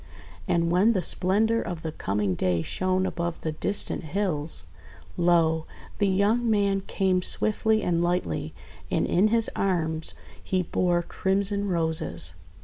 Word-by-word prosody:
And 170 0 +1
when 195 +6 +4
the 190 -4 0
splendour 215 +7 +1
of 170 -3 -5
the 160 - -3
coming 100 -7 -1
day 90 -2 0
shone 185 - 0
above 170 -2 -3
the 160 - -2
distant 200 +6 0
hills, 165 -3 -1 0.5
lo! 165 -2 +2 0.3
the 205 - +3
young 210 +5 +2
man 200 -2 +2
came 185 -2 +1
swiftly 215 +3 +1
and 170 -1 +1
lightly, 80 - -1 0.3
and - - +1
in 190 +5 +3
his 230 +1 +3
arms 160 -4 -1 0.3
he 185 -1 0
bore 175 0 +1
crimson 200 +3 0
Roses. 160 - -1
180 Hz, 140 wpm, -26 LUFS, 160-200 Hz, 0.5 s, when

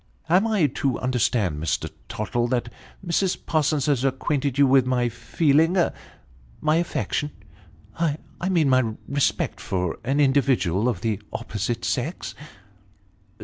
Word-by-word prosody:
" - - -33
Am 195 +5 +4
I 210 -7 +3
to 135 -1 0
understand, 110 -10 0
Mr. 80 -2 -1 0.2
Tottle, 120 +3 -1
that 120 -1 -2 0.3
Mrs. 180 +2 +1
Parsons 155 -3 +1
has 140 -4 +1
acquainted 135 0 0
you 140 - +6
with 130 -1 +4
my 125 -1 +1
feeling 150 - +2 0.8
my 155 - +2
affection 165 -3 -1 0.7
I 160 -3 0 0.3
mean 170 -6 +3
my 130 -4 +2
respect, 140 0 0
for 90 -3 -2
an 135 +4 0
individual 130 - +2
of 125 - -3
the 110 -3 -1
opposite 110 +3 -3
sex 140 +8 -2
130 Hz, 130 wpm, -24 LUFS, 120-150 Hz, 0.8 s, you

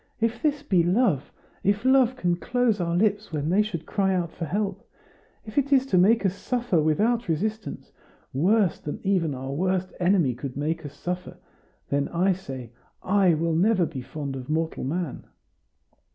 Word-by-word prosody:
If 230 +1 0
this 295 -1 0
be 185 -9 +3
love 175 - +1 0.3
if 205 +4 +1
love 260 -1 +4
can 175 -8 0
close 240 +1 0
our 170 0 0
lips 205 +1 +1
when 150 +1 -1
they 200 +3 +4
should 180 -7 -4
cry 195 0 +1
out 170 -2 -1
for 165 - -5
help 200 +4 -2 0.6
if 215 +5 0
it 280 +1 -2
is 265 -1 +5
to 195 -9 +1
make 210 +4 +4
us 185 - +2
suffer 240 -5 0
without 215 +10 +1
resistance, 215 +7 -3 0.4
worse 185 - +2
than 150 - -5
even 180 -7 +1
our 135 +1 -5
worst 185 +4 -1
enemy 175 -7 +3
could 130 +2 -7
make 160 +3 -2
us 140 - -13
suffer 180 0 -5 0.5
then, 140 0 +1
I 185 +3 +2
say, 135 -10 -8 0.3
I 195 -1 +3
never 155 - -2
will 175 +4 +3
be 130 - -4
fond 140 +1 -5
of 130 0 -7
mortal 160 +1 -1
man." 160 +2 -3
185 Hz, 175 wpm, -25 LUFS, 160-215 Hz, 0.6 s, is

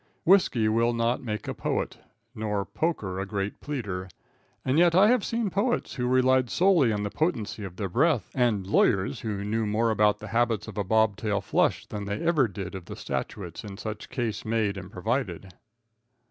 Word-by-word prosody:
Whisky 160 - +4
will 115 +2 +2
not 115 +1 0
make 105 -4 -4
a - - -2
poet, - - -2 0.3
nor 105 -3 -2
poker 105 - -2
a 95 - -2
great 100 0 -3
pleader. 100 -10 -4 0.6
And 130 +4 +2
yet 170 -1 +5
I 200 +3 +7
have 245 -4 +3
seen 230 -4 -1
poets 230 +6 0
who 125 -1 -2
relied 130 0 +3
solely 175 -9 +4
on 105 -1 -1
the 105 - -3
potency 115 - -1
of 95 -3 -7
their 100 0 -3
breath, 145 - +1
and 120 -7 +1
lawyers 95 0 +2
who 105 -3 -3
knew 110 +1 0
more 110 +2 +1
of 105 -1 +3
the - - -9
habits 115 -2 +1
of - - -6
a - - +1
bob 110 0 +2
tail 105 -2 0
flush - - +1
than 105 -1 -6
they 100 +1 -3
ever 160 -7 +3
did 95 -2 -6
of 95 -3 -7
the - - -8
statutes - - -5
in 100 -2 -8
such 110 0 -6
case 110 -4 -3
made 110 -2 0
and 95 -1 -8
provided. 95 -2 -3
110 Hz, 190 wpm, -27 LUFS, 100-130 Hz, 0.6 s, I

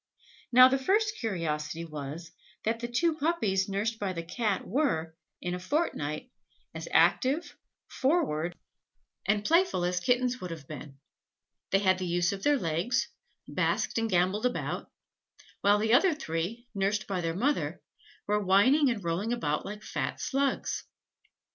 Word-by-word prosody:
Now 255 +1 +9
the 265 +1 +1
first 415 +9 +2
curiosity 165 -6 -2
was, 155 +2 -7 0.3
that 225 +1 0
the 240 - -3
two 310 +7 +1
puppies 220 - +1
nursed 215 +3 -1
by 195 -2 -2
the 170 -1 -4
Cat 200 +3 -1
were, 185 - 0 0.3
in 175 - -2
a 180 - -3
fortnight, 185 - -2 0.4
as - - -6
active, 280 +6 +3 0.3
forward, 175 - 0 0.7
and 210 -1 +1
playful 335 - +3
as 180 0 0
kittens 250 +5 +1
would 180 - -5
have 160 -5 -8
been; 145 -2 -9 0.7
they 195 - +4
had 185 -1 +2
the 185 - -2
use 175 0 +1
of 195 -1 -5
their 290 +4 +3
legs, 175 +5 0 0.4
basked - - 0
and 225 0 0
gambolled 190 +5 +2
about; 250 - -4 0.7
while 205 +1 +4
the 220 +2 +1
other 320 +6 +5
three, 195 - -4
nursed 200 0 0
by 190 -3 -2
the 165 -1 -2
mother, 275 +9 0 0.4
were 210 0 +1
whining 255 +10 +5
and 225 -5 -2
rolling 175 +7 -1
about 170 -12 -1
like 210 +1 -7
fat - - -3
slugs. 275 0 -1
205 Hz, 150 wpm, -29 LUFS, 175-255 Hz, 0.7 s, Now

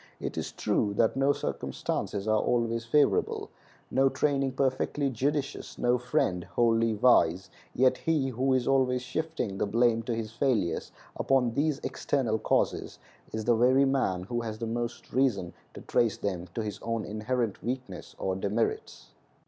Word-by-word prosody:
It - - -4
is - - -3
true 100 -1 0
that 115 - +2
no 135 +1 +3
circumstances 100 -6 -3
are 110 0 +3
always 115 -1 0
favorable, 145 +4 +1 0.4
no 135 +1 +4
training 135 -2 0
perfectly 135 +1 0
judicious, 140 +3 -2
no 120 0 +2
friend 90 -7 0
wholly 115 0 +2
wise, 90 -6 +3 0.2
yet 130 0 +3
he 155 -5 +1
who 130 +2 0
is 125 -2 0
always 130 -2 +2
shifting 145 -7 -3
the - - +1
blame 115 +2 +3
of 120 - 0
his 110 -1 -4
failures 115 -8 0 0.3
upon 125 -3 +2
these 145 +1 +1
external 115 -6 -1
causes - - 0 0.3
is 110 -1 -4
the 120 - +4
very 130 +4 +4
man 130 -10 0
who 120 +5 -3
has 110 -2 -5
the 115 - -4
most 120 +1 -4
reason 115 -10 +1 0.2
to - - -8
trace 115 -3 +1
them 90 -3 -3
to 115 - -1
his 105 -2 -5
own 115 -1 -2
inherent 110 0 -2
weakness 125 +3 -5
or 95 -1 -1
demerits. 100 +4 -2
120 Hz, 155 wpm, -28 LUFS, 110-135 Hz, 0.4 s, no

